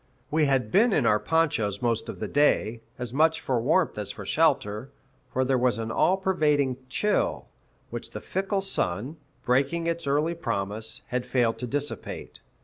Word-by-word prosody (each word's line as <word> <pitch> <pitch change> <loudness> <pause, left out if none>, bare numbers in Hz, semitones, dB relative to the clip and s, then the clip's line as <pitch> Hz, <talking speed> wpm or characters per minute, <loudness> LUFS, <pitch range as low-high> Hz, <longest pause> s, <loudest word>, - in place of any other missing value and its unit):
We 155 0 +3
had 135 -3 +1
been 215 +4 +4
in 140 - +2
our 105 -1 +4
ponchos 110 -6 +1
most 115 -2 0
of - - -6
the - - -3
day, 120 -6 +2 0.2
as 125 -1 -5
much 160 +3 +3
for 125 -6 0
warmth 155 0 +2
as 105 - -4
for 105 - -9
shelter; 130 -5 +1 0.4
for 130 +1 +1
there 130 -1 +2
was 125 -3 +2
an 110 -1 -3
all 185 +10 +3
pervading 150 -9 +1
chill, 210 0 0 0.5
which - - -6
the - - -6
fickle 195 +1 -1
sun, 135 - -1 0.3
breaking 140 +7 +1
its 170 -2 -2
early 150 +4 +2
promise, 110 -7 -3
had 125 0 -1
failed 120 -3 +1
to 125 - -4
dissipate. 145 +3 -4
135 Hz, 170 wpm, -26 LUFS, 115-160 Hz, 0.5 s, been